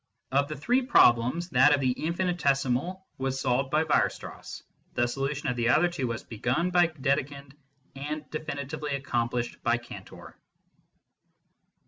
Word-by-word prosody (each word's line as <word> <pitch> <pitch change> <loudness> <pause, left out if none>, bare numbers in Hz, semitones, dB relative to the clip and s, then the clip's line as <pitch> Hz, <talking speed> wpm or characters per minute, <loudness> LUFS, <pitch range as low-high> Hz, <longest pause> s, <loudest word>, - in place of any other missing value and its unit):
Of 140 +1 +2
the 155 - -5
three 245 - +2
problems, 150 - +4
that 135 +3 +5
of - - -3
the 130 -2 +2
infinitesimal 170 0 -1
was 135 0 -2
solved 130 +1 0
by 155 +3 +2
Weier 155 - +3
strass; - - -10 0.3
the 120 - +2
solution 140 +4 -3
of 125 - 0
the 120 0 +1
other 160 +7 +4
two 150 -8 -3
was 115 -1 -4
begun 130 +11 -1
by 175 -1 +5
Dedekind, 140 -2 -2 0.4
and 150 +2 -5
definitively 150 -1 -4
accomplished 120 -3 -2
by 120 0 +2
Cantor. 120 0 -11
140 Hz, 140 wpm, -28 LUFS, 125-155 Hz, 0.4 s, that